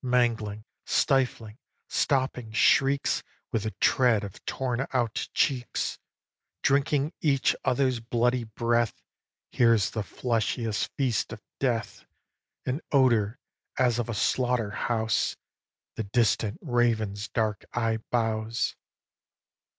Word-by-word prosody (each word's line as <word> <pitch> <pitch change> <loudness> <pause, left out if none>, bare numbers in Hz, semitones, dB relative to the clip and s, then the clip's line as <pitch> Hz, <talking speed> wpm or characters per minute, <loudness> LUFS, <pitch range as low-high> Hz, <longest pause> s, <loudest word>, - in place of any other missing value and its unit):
Mangling, 115 -4 0 0.2
stifling, 125 -4 +1 0.3
stopping 130 -5 0
shrieks 135 +5 +3 0.3
With 115 - 0
the 110 - -1
tread 120 -5 +3
of 100 0 -9
torn 130 0 -2
out 120 -4 0
cheeks, 125 -3 0 0.6
Drinking 140 +2 +2
each 140 -4 +2
other's 130 -1 +1
bloody 120 +2 +1
breath 115 +1 0 0.5
Here's 115 -5 +3
the 110 - -2
fleshliest 115 -1 -1
feast 130 -6 0
of - - -10 0.2
Death. 120 -4 -1 0.6
An 130 +5 -2
odour, 120 -5 +3 0.4
as 120 -2 +2
of 120 - -2
a 115 - -2
slaughter 120 0 +1
house, 110 +1 0 0.6
The 110 - -3
distant 105 -1 +1
raven's 115 - 0
dark 110 -3 -1
eye 115 -2 0
bows. 115 -1 0
120 Hz, 105 wpm, -27 LUFS, 110-130 Hz, 0.6 s, shrieks